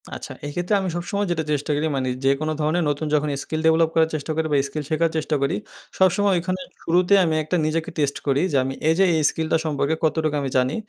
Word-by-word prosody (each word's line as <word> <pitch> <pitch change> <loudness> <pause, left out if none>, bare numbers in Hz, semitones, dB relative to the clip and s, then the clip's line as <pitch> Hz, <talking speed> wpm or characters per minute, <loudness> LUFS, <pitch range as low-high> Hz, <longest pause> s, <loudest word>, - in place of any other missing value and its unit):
আচ্ছা - - -8
এই 145 - -4
ক্ষেত্রে 175 +3 -1
আমি 190 - -2
সবসময় 200 +4 -2
যেটা 160 -2 0
চেষ্টা 150 +1 -1
করি 150 +2 0
মানে 130 -1 -1 0.2
যে 135 - +5
কোনো 155 0 -1
ধরনের 155 +3 +1
নতুন 145 +2 -2
যখন 150 0 +2
স্কিল 155 0 -3
ডেভেলপ 160 0 +4
করার 160 -1 +3
চেষ্টা 155 +1 -4
করি 160 0 0
বা - - +3
স্কিল 150 +2 -5
শেখার 165 +1 +2
চেষ্টা 155 0 -1
করি 140 - +1 0.4
সবসময় 195 +2 +3
ওইখানে 185 +2 -2 0.2
শুরুতেই 180 +4 +4
আমি 160 -1 0
একটা 155 +4 -2
নিজেকে 160 +1 -1
টেস্ট 145 -2 0
করি। 140 +1 +2
যে 140 - +2
আমি 135 +1 -3 0.2
এই - - +5
যে - - +6
এই - - +1
স্কিলটা 160 0 0
সম্পর্কে 150 0 0
কতটুক 160 -1 +1
আমি 135 - -2
জানি 130 +3 +1
160 Hz, 230 wpm, -23 LUFS, 145-170 Hz, 0.4 s, যে